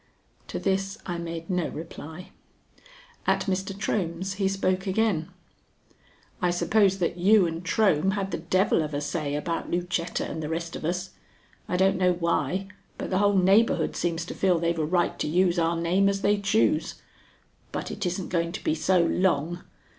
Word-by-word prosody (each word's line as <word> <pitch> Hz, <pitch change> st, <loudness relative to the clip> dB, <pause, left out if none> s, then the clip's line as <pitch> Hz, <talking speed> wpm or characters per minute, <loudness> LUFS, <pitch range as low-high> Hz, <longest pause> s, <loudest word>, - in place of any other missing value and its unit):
To -, -, -4 dB
this 195 Hz, +1 st, -1 dB
I 175 Hz, -2 st, -3 dB
made 165 Hz, -1 st, -5 dB
no 180 Hz, -3 st, 0 dB
reply. 160 Hz, +2 st, -9 dB, 1.0 s
At -, -, +3 dB
Mr. 190 Hz, 0 st, -2 dB
Trohm's 190 Hz, -2 st, -2 dB
he 195 Hz, 0 st, 0 dB
spoke 190 Hz, 0 st, 0 dB
again: 190 Hz, -5 st, +1 dB, 1.1 s
"I 180 Hz, -, +2 dB
suppose 195 Hz, +2 st, +3 dB
that 180 Hz, -1 st, -1 dB
you 195 Hz, +2 st, +5 dB
and 165 Hz, +1 st, -4 dB
Trohm 190 Hz, -3 st, +2 dB
had 195 Hz, -2 st, -2 dB
the -, -, -2 dB
devil 185 Hz, +2 st, +2 dB
of 150 Hz, -1 st, -3 dB
a -, -, 0 dB
say 145 Hz, -1 st, -2 dB
about 165 Hz, +3 st, -3 dB
Lucetta 175 Hz, 0 st, -1 dB
and 160 Hz, -, -5 dB
the 150 Hz, -, -4 dB
rest 165 Hz, +1 st, -3 dB
of -, -, -6 dB
us. 180 Hz, +3 st, -2 dB, 0.6 s
I 180 Hz, -, 0 dB
don't 190 Hz, +1 st, +3 dB
know 180 Hz, -1 st, +4 dB
why, 170 Hz, +2 st, -1 dB, 0.3 s
but -, -, -5 dB
the 185 Hz, -, +2 dB
whole 205 Hz, -1 st, +3 dB
neighborhood 195 Hz, +5 st, +3 dB
seems 170 Hz, -1 st, -1 dB
to -, -, -6 dB
feel 185 Hz, -2 st, +2 dB
they've 170 Hz, 0 st, 0 dB
a -, -, +1 dB
right 175 Hz, +2 st, 0 dB
to -, -, -1 dB
use 175 Hz, +2 st, +2 dB
our 165 Hz, 0 st, +2 dB
name 185 Hz, +4 st, +3 dB
as 195 Hz, 0 st, -1 dB
they 205 Hz, 0 st, +2 dB
choose. 220 Hz, +9 st, +1 dB, 0.8 s
But -, -, -4 dB
it -, -, -5 dB
isn't 180 Hz, +1 st, -3 dB
going 170 Hz, -1 st, -1 dB
to -, -, -6 dB
be -, -, +1 dB
so, 180 Hz, +2 st, +2 dB
long. 175 Hz, -1 st, +1 dB
180 Hz, 180 wpm, -26 LUFS, 170-195 Hz, 1.1 s, you